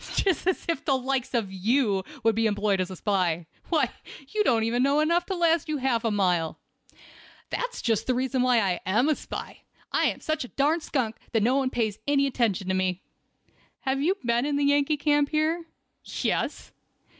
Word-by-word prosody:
"Just 370 Hz, -3 st, +1 dB
as 370 Hz, -, 0 dB
if 335 Hz, -2 st, -1 dB
the 270 Hz, -2 st, +2 dB
likes 260 Hz, 0 st, -2 dB
of 205 Hz, -5 st, -1 dB
you 205 Hz, 0 st, +1 dB, 0.2 s
would 225 Hz, 0 st, +4 dB
be 225 Hz, +1 st, +2 dB
employed 205 Hz, -2 st, +1 dB
as 185 Hz, -, -2 dB
a 185 Hz, -, -6 dB
spy! 180 Hz, -4 st, 0 dB, 0.2 s
Why, 325 Hz, -3 st, +2 dB, 0.4 s
you 425 Hz, -1 st, +1 dB
don't 225 Hz, -, +2 dB, 0.2 s
know 280 Hz, +3 st, +3 dB
enough 340 Hz, +3 st, +2 dB
to 385 Hz, -, -2 dB
last 335 Hz, -2 st, +2 dB
you 305 Hz, -, 0 dB
half 255 Hz, -4 st, 0 dB
a 230 Hz, -, +1 dB
mile." 180 Hz, -6 st, 0 dB, 0.9 s
"That's -, -, -3 dB
just 225 Hz, -3 st, 0 dB
the 255 Hz, -, +2 dB
reason 260 Hz, 0 st, 0 dB
why 250 Hz, -2 st, +4 dB
I 185 Hz, -4 st, 0 dB
am 215 Hz, +9 st, +3 dB
a 305 Hz, -, +3 dB
spy. -, -, -7 dB, 0.3 s
I -, -, +2 dB
am -, -, 0 dB
such 310 Hz, -2 st, -2 dB
a -, -, -7 dB
darn 300 Hz, +6 st, +1 dB
skunk 240 Hz, -8 st, -2 dB, 0.2 s
no 225 Hz, +4 st, +3 dB
one 270 Hz, -2 st, +1 dB
pays 220 Hz, -5 st, -1 dB
any 280 Hz, -1 st, +3 dB
attention 230 Hz, -8 st, 0 dB
to -, -, +2 dB
me." 185 Hz, -1 st, -1 dB, 0.8 s
"Have 270 Hz, 0 st, -1 dB
you 355 Hz, +7 st, +2 dB
been 235 Hz, +3 st, +2 dB
in 290 Hz, -, 0 dB
the 285 Hz, 0 st, +1 dB
Yankee 285 Hz, +1 st, +3 dB
camp 290 Hz, 0 st, +2 dB
here?" 320 Hz, +2 st, 0 dB, 0.4 s
"Yes." -, -, -2 dB
255 Hz, 190 wpm, -26 LUFS, 210-295 Hz, 0.9 s, would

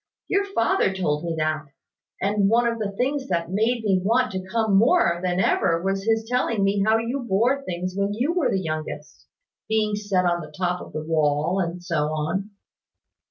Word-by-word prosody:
Your 395 Hz, +1 st, +2 dB
father 230 Hz, -3 st, +2 dB
told 165 Hz, -5 st, -1 dB
me 165 Hz, -1 st, -2 dB
that: 155 Hz, -1 st, -1 dB, 0.5 s
and 200 Hz, 0 st, +1 dB
one 235 Hz, +2 st, +3 dB
of 230 Hz, -1 st, 0 dB
the 210 Hz, -2 st, -1 dB
things 270 Hz, +5 st, -1 dB
that 170 Hz, -1 st, -1 dB
made 225 Hz, +4 st, +1 dB
me 190 Hz, -3 st, +2 dB
want 245 Hz, +5 st, +2 dB
to 185 Hz, 0 st, -4 dB
come 220 Hz, -3 st, +2 dB
more 215 Hz, -, +4 dB
than 180 Hz, 0 st, 0 dB
ever 165 Hz, -3 st, +2 dB
was 195 Hz, 0 st, -1 dB
his 225 Hz, 0 st, +1 dB
telling 235 Hz, -4 st, 0 dB
me 195 Hz, 0 st, +2 dB
how 220 Hz, +2 st, +4 dB
you 235 Hz, +4 st, -2 dB
bore 240 Hz, +4 st, +1 dB
things 180 Hz, -5 st, -4 dB
when 200 Hz, +1 st, 0 dB
you 265 Hz, +9 st, 0 dB
were 350 Hz, -5 st, +1 dB
the 195 Hz, -, +1 dB
youngest 155 Hz, -2 st, -6 dB, 0.4 s
being 215 Hz, -1 st, +1 dB
set 205 Hz, -3 st, 0 dB
on 175 Hz, 0 st, +1 dB
the 155 Hz, -1 st, -10 dB
top 180 Hz, -1 st, -1 dB
of -, -, -10 dB
that 155 Hz, 0 st, -5 dB
wall, 155 Hz, +3 st, +1 dB
and 175 Hz, -1 st, -3 dB
so 170 Hz, -4 st, 0 dB
on." 175 Hz, +7 st, -2 dB
195 Hz, 195 wpm, -24 LUFS, 170-225 Hz, 0.5 s, more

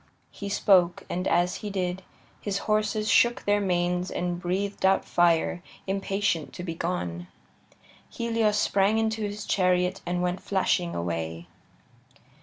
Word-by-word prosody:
He 200 Hz, -, -6 dB
spoke, 185 Hz, -3 st, +3 dB
and 180 Hz, +1 st, -2 dB
as 175 Hz, +1 st, +2 dB
he 210 Hz, -, -6 dB
did, 185 Hz, -1 st, -2 dB, 0.4 s
his 200 Hz, -1 st, -2 dB
horses 215 Hz, 0 st, +1 dB
shook 235 Hz, +3 st, +4 dB
their 205 Hz, 0 st, +3 dB
manes 180 Hz, -1 st, 0 dB
and 175 Hz, 0 st, -3 dB
breathed 195 Hz, +3 st, -2 dB
out 190 Hz, 0 st, +3 dB
fire, 175 Hz, 0 st, +2 dB, 0.2 s
impatient 195 Hz, -4 st, -1 dB
to 180 Hz, -, -7 dB
be 170 Hz, -2 st, -3 dB
gone. 90 Hz, -, -3 dB, 0.8 s
Helios 225 Hz, -2 st, 0 dB
sprang 200 Hz, +1 st, +2 dB
into 220 Hz, 0 st, 0 dB
his 205 Hz, 0 st, -4 dB
chariot 180 Hz, 0 st, +1 dB
and 175 Hz, 0 st, -2 dB
went 180 Hz, +1 st, -1 dB
flashing 185 Hz, -3 st, 0 dB
away. 85 Hz, -1 st, -3 dB
185 Hz, 135 wpm, -27 LUFS, 175-205 Hz, 0.8 s, shook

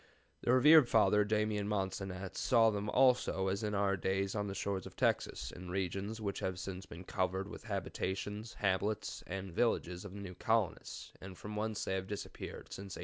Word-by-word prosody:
The -, -, +2 dB
Rev. 140 Hz, +1 st, +8 dB
Father 105 Hz, -2 st, +5 dB
Damian 105 Hz, -1 st, 0 dB
Mansanet 95 Hz, -2 st, -3 dB
saw 115 Hz, -3 st, +4 dB
them 105 Hz, 0 st, -2 dB
also 125 Hz, -6 st, +3 dB
as 100 Hz, +1 st, -1 dB
in 105 Hz, -1 st, -1 dB
our 100 Hz, 0 st, +2 dB
days 95 Hz, +2 st, 0 dB
on 105 Hz, -1 st, -1 dB
the 100 Hz, -, -4 dB
shores 100 Hz, -1 st, -2 dB
of -, -, -13 dB
Texas, 60 Hz, -, 0 dB
in 90 Hz, 0 st, -9 dB
regions 95 Hz, +4 st, -2 dB
which 100 Hz, -2 st, -2 dB
have 95 Hz, -1 st, -2 dB
since 90 Hz, +1 st, -6 dB
been 85 Hz, +2 st, -9 dB
covered 95 Hz, 0 st, -1 dB
with -, -, -8 dB
the 115 Hz, -, -14 dB
habitations, 105 Hz, +2 st, -3 dB
hamlets, 100 Hz, +2 st, -1 dB
and 95 Hz, -1 st, -5 dB
villages 90 Hz, -5 st, +1 dB
of 100 Hz, -2 st, -8 dB
the -, -, -6 dB
new 95 Hz, -2 st, -6 dB
colonists, 110 Hz, 0 st, -1 dB
and 95 Hz, -1 st, -9 dB
from 105 Hz, +3 st, -7 dB
whence 110 Hz, 0 st, -2 dB
they -, -, -1 dB
have 95 Hz, 0 st, -2 dB
disappeared 105 Hz, 0 st, -6 dB
since 100 Hz, 0 st, -7 dB
1828." -, -, -9 dB
100 Hz, 195 wpm, -35 LUFS, 95-105 Hz, -, Rev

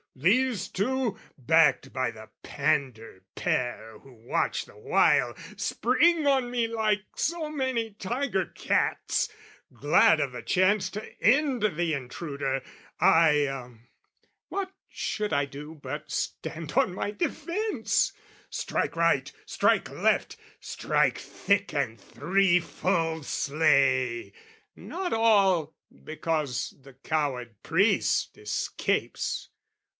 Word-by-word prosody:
These 205 Hz, -, +2 dB
two, 250 Hz, +2 st, -1 dB, 0.2 s
"Backed 150 Hz, -1 st, +3 dB
by 130 Hz, -2 st, 0 dB
the 110 Hz, -1 st, -13 dB
pander 130 Hz, -9 st, -2 dB
pair 115 Hz, -3 st, -2 dB
who 135 Hz, -, -17 dB, 0.2 s
watch -, -, 0 dB
the -, -, -18 dB
while, 440 Hz, +1 st, +3 dB, 0.2 s
"Spring 335 Hz, -3 st, +2 dB
on 265 Hz, -3 st, +2 dB
me 240 Hz, -2 st, +1 dB
like 215 Hz, -3 st, 0 dB
so 330 Hz, -1 st, -1 dB
many 260 Hz, -7 st, -2 dB
tiger 240 Hz, +8 st, -2 dB
cats, -, -, 0 dB, 0.4 s
"Glad -, -, +4 dB
of -, -, -1 dB
the -, -, -6 dB
chance 190 Hz, +1 st, +2 dB
to 215 Hz, +1 st, -9 dB
end 275 Hz, +1 st, +3 dB
the 175 Hz, -5 st, 0 dB
intruder. 140 Hz, 0 st, -3 dB, 0.4 s
I 145 Hz, -6 st, +3 dB, 0.7 s
"What 385 Hz, -1 st, -3 dB, 0.2 s
should 210 Hz, -1 st, -3 dB
I 140 Hz, -, +2 dB
do 145 Hz, +3 st, -9 dB
but 150 Hz, +1 st, -7 dB
stand 160 Hz, -2 st, -4 dB
on 180 Hz, -, +2 dB
my 200 Hz, -, -3 dB
defence, 355 Hz, -, -1 dB, 0.4 s
"Strike -, -, -2 dB
right, -, -, +2 dB
strike -, -, +1 dB
left, -, -, +1 dB, 0.2 s
strike -, -, 0 dB
thick 200 Hz, -3 st, -1 dB
and 130 Hz, -6 st, -2 dB
threefold, 170 Hz, +1 st, +1 dB
slay, 135 Hz, -5 st, +1 dB, 0.4 s
"Not 365 Hz, 0 st, -4 dB
all 195 Hz, -8 st, +3 dB, 0.3 s
because 155 Hz, -5 st, -2 dB
the 135 Hz, 0 st, -15 dB
coward 135 Hz, -5 st, -2 dB
priest -, -, +2 dB
escapes. 105 Hz, -1 st, -2 dB
165 Hz, 105 wpm, -27 LUFS, 140-225 Hz, 0.7 s, Glad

